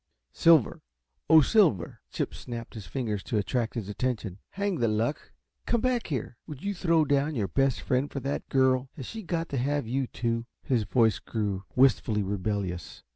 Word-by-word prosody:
"Silver 165 Hz, -7 st, +4 dB, 0.5 s
oh, 160 Hz, 0 st, +9 dB
Silver!" 145 Hz, -, +2 dB
Chip -, -, -3 dB
snapped 120 Hz, -2 st, -7 dB
his 105 Hz, -5 st, -8 dB
fingers 105 Hz, -2 st, -2 dB
to 115 Hz, -, -2 dB
attract 115 Hz, +3 st, -1 dB
his 110 Hz, -5 st, -3 dB
attention. 105 Hz, -3 st, -3 dB
"Hang 200 Hz, -2 st, -2 dB
the 115 Hz, -, +2 dB
luck, 110 Hz, +6 st, -1 dB, 0.4 s
come 235 Hz, -, +2 dB
back 250 Hz, 0 st, 0 dB
here! 125 Hz, -5 st, -4 dB
Would 150 Hz, -4 st, -8 dB
you 205 Hz, 0 st, -1 dB
throw 165 Hz, -4 st, +2 dB
down 145 Hz, +1 st, +1 dB
your 105 Hz, -5 st, 0 dB
best 135 Hz, +6 st, +1 dB
friend 130 Hz, +2 st, 0 dB
for 140 Hz, -, -4 dB
that 140 Hz, +2 st, -3 dB
girl? 130 Hz, -1 st, +2 dB
Has 135 Hz, -, -7 dB
she 225 Hz, -, -6 dB
got 170 Hz, -3 st, -2 dB
to 140 Hz, -, -2 dB
have 140 Hz, +2 st, 0 dB
you, 130 Hz, +3 st, -1 dB
too?" 115 Hz, -1 st, -2 dB, 0.2 s
His 120 Hz, -5 st, +1 dB
voice 115 Hz, 0 st, +3 dB
grew 100 Hz, -4 st, -3 dB
wistfully 115 Hz, -5 st, +3 dB
rebellious. 95 Hz, -4 st, -3 dB
125 Hz, 180 wpm, -28 LUFS, 110-145 Hz, 0.5 s, oh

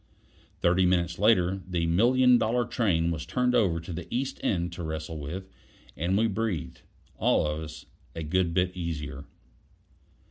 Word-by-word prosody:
Thirty 90 Hz, +1 st, +3 dB
minutes 85 Hz, -1 st, +1 dB
later, 95 Hz, -3 st, +3 dB
the 85 Hz, -2 st, 0 dB
million 120 Hz, +8 st, +4 dB
dollar 120 Hz, +2 st, +1 dB
train 85 Hz, -10 st, +1 dB
was 80 Hz, -2 st, -3 dB
turned 125 Hz, -1 st, 0 dB
over 95 Hz, -9 st, +2 dB
to 85 Hz, +2 st, -7 dB
the 85 Hz, +1 st, -7 dB
East 130 Hz, +2 st, -2 dB
End 85 Hz, -3 st, -1 dB
to 85 Hz, -, -7 dB
wrestle 80 Hz, 0 st, -4 dB
with, 90 Hz, +7 st, -6 dB, 0.5 s
and 85 Hz, +7 st, 0 dB
we 110 Hz, -, +3 dB
breathed, 110 Hz, -5 st, -2 dB, 0.4 s
all -, -, +2 dB
of 75 Hz, +1 st, -2 dB
us, 80 Hz, -1 st, -9 dB, 0.3 s
a 80 Hz, -, -4 dB
good 85 Hz, +2 st, +1 dB
bit 90 Hz, +1 st, 0 dB
easier. 75 Hz, -4 st, -5 dB
90 Hz, 155 wpm, -28 LUFS, 80-105 Hz, 0.5 s, million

